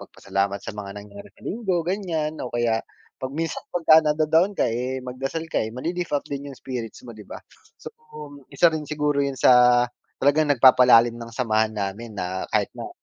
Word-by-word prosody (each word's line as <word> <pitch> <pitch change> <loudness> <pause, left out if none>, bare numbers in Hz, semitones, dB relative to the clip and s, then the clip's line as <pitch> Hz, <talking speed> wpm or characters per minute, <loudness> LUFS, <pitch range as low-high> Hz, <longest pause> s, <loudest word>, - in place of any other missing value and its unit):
magpasalamat 100 0 -3
sa - - -5
mga 100 -2 -6
nangyari 100 0 -11
sa - - -22
linggo, 190 -6 -2
ganyan 165 -5 -3
o 125 - -4
kaya 120 -2 0 0.4
'pag 130 0 -5
minsan 165 0 -3
paka 160 -2 +5
nada-down 160 +5 +1
ka - - +2
eh, 125 +3 -3
magdasal 135 +6 -4
ka - - +1
eh 110 - -2
mali-lift 170 +7 -4
up 140 - -4
din 140 0 -6
yung - - -13
spirits 125 -4 -7
mo 120 - -9
di 105 -2 -12
ba? - - -7 0.4
So - - -10 0.6
isa 170 -1 +3
rin 155 -2 -4
siguro 150 -1 0
yun 140 -1 -1
sa 125 -1 +5 0.3
talagang 145 +2 +2
nagpapalalim 125 -3 +6
ng 115 -1 -8
samahan 110 -3 0
namin 105 +2 -5
na 95 0 -4
kahit - - 0
na - - -7
130 Hz, 185 wpm, -23 LUFS, 115-155 Hz, 0.6 s, nagpapalalim